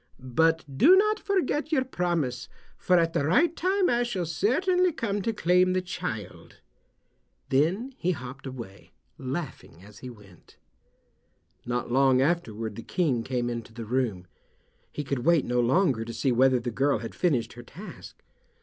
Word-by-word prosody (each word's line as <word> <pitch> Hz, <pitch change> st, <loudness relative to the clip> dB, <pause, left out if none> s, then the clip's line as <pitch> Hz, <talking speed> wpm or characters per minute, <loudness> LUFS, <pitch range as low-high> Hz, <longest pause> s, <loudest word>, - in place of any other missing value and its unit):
But 160 Hz, 0 st, +3 dB
do 360 Hz, +5 st, +8 dB
not 425 Hz, +2 st, +3 dB
forget 330 Hz, -6 st, -1 dB
your 270 Hz, -5 st, +2 dB
promise, 170 Hz, -, -2 dB, 0.3 s
for 180 Hz, -, +2 dB
at 165 Hz, -1 st, +2 dB
the -, -, +1 dB
right 290 Hz, -, +3 dB
time 375 Hz, +1 st, +1 dB
I 240 Hz, 0 st, +2 dB
shall 205 Hz, -8 st, -2 dB
certainly 355 Hz, -, +1 dB
come 205 Hz, -9 st, -2 dB
to 225 Hz, -, -1 dB
claim 185 Hz, -2 st, +2 dB
the 185 Hz, -, +1 dB
child." 110 Hz, -, -6 dB, 0.9 s
Then 180 Hz, -, +1 dB
he 180 Hz, -, -1 dB
hopped 135 Hz, -4 st, -5 dB
away, 115 Hz, -7 st, -10 dB, 0.3 s
laughing 130 Hz, -, -6 dB
as 105 Hz, +1 st, -14 dB
he 130 Hz, -, -8 dB
went. 105 Hz, -7 st, -17 dB, 1.1 s
Not 120 Hz, 0 st, -2 dB
long 130 Hz, 0 st, +4 dB
afterward 115 Hz, -9 st, -1 dB
the -, -, -5 dB
King 145 Hz, -6 st, 0 dB
came 120 Hz, 0 st, -2 dB
into 115 Hz, -1 st, -5 dB
the 115 Hz, -1 st, -6 dB
room. 110 Hz, -6 st, -1 dB, 0.7 s
He 150 Hz, -, -4 dB
could 135 Hz, -1 st, -2 dB
wait 165 Hz, +3 st, +3 dB
no 125 Hz, 0 st, 0 dB
longer 125 Hz, -1 st, +2 dB
to 115 Hz, +1 st, -7 dB
see 130 Hz, +3 st, 0 dB
whether 130 Hz, +1 st, +4 dB
the 120 Hz, 0 st, -4 dB
girl 135 Hz, +4 st, +1 dB
had 115 Hz, +1 st, -7 dB
finished 125 Hz, -11 st, 0 dB
her 120 Hz, -, -10 dB
task. 180 Hz, -, -12 dB
140 Hz, 160 wpm, -27 LUFS, 120-185 Hz, 1.1 s, do